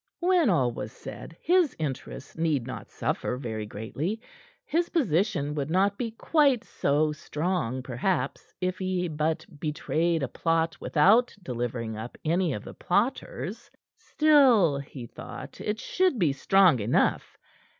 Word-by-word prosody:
When 355 -6 +3
all 130 -10 +3
was 110 -2 -6
said, 165 - -10
his 350 -4 +3
interests 140 -2 -5
need 155 -6 0
not 130 - -7
suffer 125 - -2
very 110 -5 -4
greatly. 135 - -4 0.5
His 340 +3 0
position 175 - +1
would 145 -1 -2
not 195 +4 +2
be 235 +1 -3
quite 270 +1 +2
so 150 -3 +1
strong, 150 -4 -2
perhaps, 135 +3 -2
if 185 0 -2
he 185 -1 -1
but 155 0 -1
betrayed 160 +1 0
a - - 0
plot 165 +3 0
without 215 +11 +4
delivering 120 -4 -3
up 110 +3 -7
any 170 +1 +2
of 105 - -5
the - - -9
plotters; 225 +6 -2 0.3
still, 255 - +4
he 135 -3 -8
thought, - - -9
it 210 +1 -2
should 365 -2 +1
be 165 -9 +2
strong 180 0 +4
enough. 105 +3 +1
165 Hz, 140 wpm, -27 LUFS, 135-205 Hz, 0.5 s, without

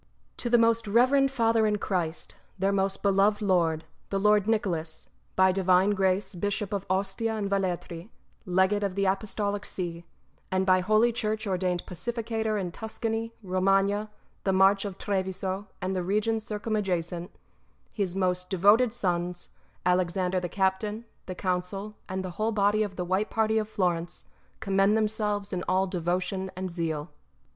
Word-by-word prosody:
To 240 - -2
the 240 - +5
most 230 -1 +3
reverend 260 +6 +4
Father 230 -4 +2
in 210 0 +1
Christ, 175 -5 -3 0.2
their 195 +1 +1
most 195 0 0
beloved 200 +1 +3
Lord, 170 -6 +1 0.2
the 195 - 0
Lord 210 0 +4
Nicholas, 175 -8 -2 0.2
by 190 0 +5
divine 185 +1 +3
grace 190 0 +1
JBishop 205 +3 -2
of 200 -1 -3
Ostia 195 +4 0
and 205 -2 -2
Velletri, 185 -2 -2 0.3
Legate 190 +2 +2
of 200 -2 -1
the 200 0 +1
Apostolic 200 +1 -1
See, 170 -4 -5 0.5
and 190 0 +1
by 185 -1 +5
Holy 215 +5 +3
Church 215 -1 -2
ordained 180 -2 -1
Pacificator 220 +2 -2
in 180 -3 -3
Tuscany, 225 +2 -4
Bomagna, 195 +3 +2 0.3
the 195 - +2
March 195 +1 +4
of 195 -2 -5
Treviso, 190 0 -2 0.2
and 190 +1 -1
the 185 - 0
regions 215 +4 0
circumadjacent, 190 -5 -2 0.6
his 195 -5 -2
most 180 -1 0
devoted 210 +6 +4
sons, 175 -4 -2 0.4
Alexander 180 +1 +1
the 175 -1 -4
Captain, 200 +4 -1 0.2
the 185 - -5
Council, 185 +3 -2 0.2
and 190 0 -3
the 185 - -5
ivhole 215 +4 -1
body 205 +1 +3
of 205 -3 -2
the 180 - -3
WJiite 190 +4 0
Party 220 0 +2
of 215 0 -3
Plorence, 175 -4 -1 0.4
commend 195 +2 +3
themselves 210 -2 -1
in 180 - -1
all 185 +1 +3
devotion 185 +1 -2
and 185 0 -4
zeal. 165 -2 -3
195 Hz, 150 wpm, -27 LUFS, 185-210 Hz, 0.6 s, the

